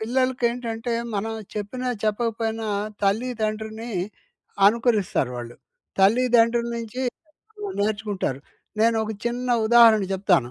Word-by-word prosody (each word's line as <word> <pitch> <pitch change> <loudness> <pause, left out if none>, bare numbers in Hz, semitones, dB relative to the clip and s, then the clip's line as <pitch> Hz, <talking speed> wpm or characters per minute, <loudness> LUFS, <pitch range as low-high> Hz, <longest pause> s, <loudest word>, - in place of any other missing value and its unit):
పిల్లలకేంటంటే 240 -1 -1 0.2
మనం 220 +3 -2 0.2
చెప్పిన 215 +5 -4 0.2
చెప్పకపోయినా 225 0 -1 0.4
తల్లిదండ్రిని 220 +1 -2 0.8
అనుకరిస్తారు 215 - +2
వాళ్ళు. 120 0 -7 0.4
తల్లిదండ్రుల 235 +2 +4
నుంచి 230 +3 -5 0.8
నేర్చుకుంటారు. 205 - -1 0.4
నేను 230 0 +4
ఒక 220 - -4
చిన్న 245 +1 -2 0.2
ఉదాహరణ 230 -2 +7
చెప్తాను. 180 -10 +2
225 Hz, 85 wpm, -24 LUFS, 210-240 Hz, 0.8 s, ఉదాహరణ